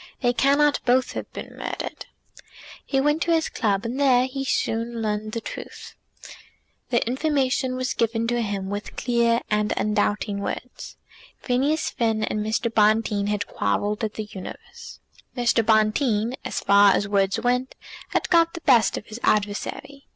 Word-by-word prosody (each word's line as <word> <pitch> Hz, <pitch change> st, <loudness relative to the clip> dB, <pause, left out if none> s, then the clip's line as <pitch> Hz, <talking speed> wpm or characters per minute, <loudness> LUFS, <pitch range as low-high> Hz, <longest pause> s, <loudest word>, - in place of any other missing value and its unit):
"They 245 Hz, -2 st, +2 dB
cannot 285 Hz, +3 st, +3 dB
both 255 Hz, +1 st, +2 dB
have -, -, -6 dB
been -, -, -9 dB
murdered." -, -, -6 dB, 0.8 s
He 270 Hz, -, 0 dB
went 295 Hz, +3 st, +1 dB
to 335 Hz, -, +2 dB
his 320 Hz, -1 st, +1 dB
club, 205 Hz, -1 st, -1 dB
and 245 Hz, +4 st, -3 dB
there 255 Hz, -3 st, +4 dB
he 270 Hz, +1 st, -4 dB
soon 230 Hz, -2 st, -1 dB
learned 215 Hz, 0 st, -2 dB
the 230 Hz, -, -3 dB
truth. -, -, -8 dB, 1.0 s
The 240 Hz, -2 st, +1 dB
information 260 Hz, 0 st, 0 dB
was 255 Hz, 0 st, -2 dB
given 230 Hz, 0 st, 0 dB
to 240 Hz, 0 st, 0 dB
him 200 Hz, -3 st, -3 dB
with 205 Hz, +1 st, -5 dB
clear 235 Hz, -1 st, +2 dB
and 210 Hz, 0 st, +1 dB
undoubting 210 Hz, -1 st, 0 dB
words. 250 Hz, +5 st, -6 dB, 0.4 s
Phineas 295 Hz, +6 st, 0 dB
Finn 225 Hz, -2 st, 0 dB
and 215 Hz, -, -1 dB
Mr. 220 Hz, +2 st, -1 dB
Bonteen 215 Hz, -1 st, +2 dB
had 210 Hz, 0 st, -1 dB
quarrelled 205 Hz, -, -1 dB
at 215 Hz, -1 st, -2 dB
The 215 Hz, -, -3 dB
Universe. 190 Hz, -, -10 dB, 0.4 s
Mr. 240 Hz, -1 st, +2 dB
Bonteen, 220 Hz, +1 st, +2 dB
as -, -, -3 dB
far 200 Hz, 0 st, +6 dB
as 200 Hz, -, 0 dB
words 195 Hz, -1 st, +1 dB
went, 250 Hz, +1 st, 0 dB, 0.3 s
had -, -, 0 dB
got 335 Hz, -1 st, +4 dB
the 340 Hz, -, -7 dB
best 235 Hz, -6 st, +4 dB
of -, -, -7 dB
his 220 Hz, +2 st, -9 dB
adversary. 215 Hz, +7 st, -1 dB
230 Hz, 160 wpm, -24 LUFS, 210-255 Hz, 1.0 s, far